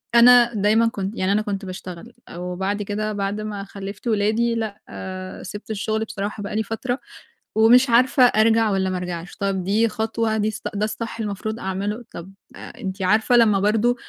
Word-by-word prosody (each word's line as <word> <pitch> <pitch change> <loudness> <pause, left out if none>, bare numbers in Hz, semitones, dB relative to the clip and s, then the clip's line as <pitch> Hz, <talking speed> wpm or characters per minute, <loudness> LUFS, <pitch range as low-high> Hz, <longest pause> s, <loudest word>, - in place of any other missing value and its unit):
أنا 240 0 +7
دايمًا 215 +3 +3
كنت 200 -1 -4
يعني 190 +1 +1
أنا 210 +1 +2
كنت 200 -2 -4
باشتغل 185 +4 -8 0.2
وبعد 190 +3 -3
كده 215 +1 -3
بعد 200 +1 -2
ما 205 -2 -5
خلَّفت 200 +4 -8
ولادي 220 +2 +1
لأ، 220 -3 -4
آآ، 185 0 -7
سِبت 205 +3 -8
الشغل 220 +1 -1
بصراحة 205 -2 -5
بقى 200 - -5
لي 220 - +1
فترة 245 +4 -3 0.6
ومش 240 +3 +6
عارفة 250 +2 +4
أرجع 225 -1 +4
والّا 190 -1 0
ما 185 - -2
أرجعش. 180 0 -6
طَب، 195 -2 -1
دي 215 +5 +2
خطوة، 220 0 -1
دي 215 +1 0 0.2
ده 205 +1 0
الصح 225 +1 -5
المفروض 215 +1 -4
أعمله؟ 200 +5 -3
طَب، 175 +3 -8 0.2
أنتِ 190 0 -7
عارفة 220 +6 +3
لمّا 210 -4 +5
برضه 220 +4 +2
210 Hz, 170 wpm, -22 LUFS, 195-225 Hz, 0.6 s, أنا